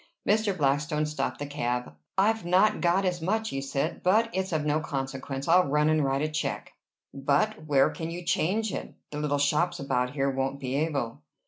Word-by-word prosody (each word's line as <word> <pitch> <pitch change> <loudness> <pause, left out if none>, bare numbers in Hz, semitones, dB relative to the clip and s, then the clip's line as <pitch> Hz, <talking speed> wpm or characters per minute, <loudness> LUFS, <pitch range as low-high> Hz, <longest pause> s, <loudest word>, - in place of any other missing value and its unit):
Mr. 210 -2 +2
Blackstone 150 +1 +1
stopped 150 0 -2
the 145 - -4
cab. 125 - -2 0.2
"I've 220 +3 +3
not 185 +5 +3
got 180 +3 +2
as 180 -2 -1
much," 220 +6 0
he 135 - -3
said. 140 +3 -2
"But 220 +5 +3
it's 190 0 -1
of 155 -2 0
no 150 +1 +2
consequence. 135 -2 -4
I'll 180 +1 +5
run 150 +2 +2
and 155 -1 +3
write 135 +1 0
a - - +1
check." 155 0 -3 0.4
"But 150 +8 0
where 140 -3 +4
can 165 0 -5
you 175 +1 -6
change 200 +6 +1
it? - - -6 0.2
The 150 - -4
little 150 -1 0
shops 170 +5 +1
about 125 -2 -1
here 135 -1 +1
won't 135 +1 -2
be 130 -2 -4
able." 140 - -1
150 Hz, 195 wpm, -27 LUFS, 140-180 Hz, 0.4 s, I'll